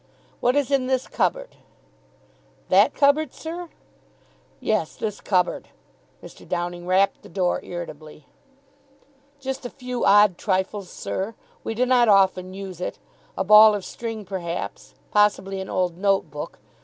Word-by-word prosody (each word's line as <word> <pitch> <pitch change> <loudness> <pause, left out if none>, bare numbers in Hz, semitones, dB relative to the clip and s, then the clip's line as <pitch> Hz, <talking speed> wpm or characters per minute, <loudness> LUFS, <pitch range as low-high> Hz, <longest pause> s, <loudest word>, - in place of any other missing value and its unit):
"What 250 +2 +2
is 285 -1 +1
in 270 -2 +2
this 260 -1 0
cupboard?" - - -2 1.1
"That - - +5
cupboard, 285 0 +2
sir?" 340 +2 -7 0.9
"Yes. 210 -8 -1
This 210 -2 -4
cupboard." 180 -3 0 0.6
Mr. - - -13
Downing 175 0 -3
rapped 190 +2 +2
the - - -14
door 180 -2 -1
irritably. 155 -4 -8 1.1
"Just 265 -1 -5
a 245 - -5
few 250 -2 -5
odd 205 -2 +5
trifles, 190 -1 -1
sir. 205 +4 -4 0.3
We 225 - -4
do 250 +3 +2
not 250 -2 +4
often 190 -2 +3
use 190 -3 -8
it. - - -4 0.4
A 190 - +1
ball 210 +2 +8
of 200 - -5
string, 225 -3 -6
perhaps. 180 -3 -5 0.2
Possibly 195 -2 +2
an 190 - -7
old 180 -2 -1
note 195 -5 +1
book. 150 0 -7
200 Hz, 140 wpm, -23 LUFS, 185-245 Hz, 1.1 s, ball